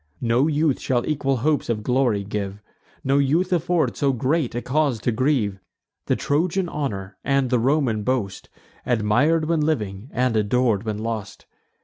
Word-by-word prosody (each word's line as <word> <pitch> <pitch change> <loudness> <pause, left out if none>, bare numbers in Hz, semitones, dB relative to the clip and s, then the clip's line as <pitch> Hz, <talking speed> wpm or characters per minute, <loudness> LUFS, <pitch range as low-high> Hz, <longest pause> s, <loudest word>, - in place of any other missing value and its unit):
No 120 +5 +3
youth 150 -2 +1
shall 120 -2 -1
equal 135 -3 0
hopes 155 -5 +1
of 105 -2 -1
glory 125 -4 +1
give, 100 0 -4 0.4
No 135 +1 +2
youth 165 +7 +2
afford 175 0 +1
so 140 -2 +1
great 130 +1 0
a 120 - -1
cause 140 -3 +1
to 120 - +1
grieve; 115 -5 0 0.5
The - - +2
Trojan 175 +5 0
honour, 100 - -4
and 135 -2 +1
the 125 - +3
Roman 130 -3 +1
boast, 105 -4 -2 0.3
Admir'd 125 +8 +2
when 165 -1 +1
living, 110 -7 -2
and 125 -2 0
ador'd 110 0 +1
when 110 -2 -2
lost! 110 -2 -5
130 Hz, 155 wpm, -23 LUFS, 110-150 Hz, 0.5 s, No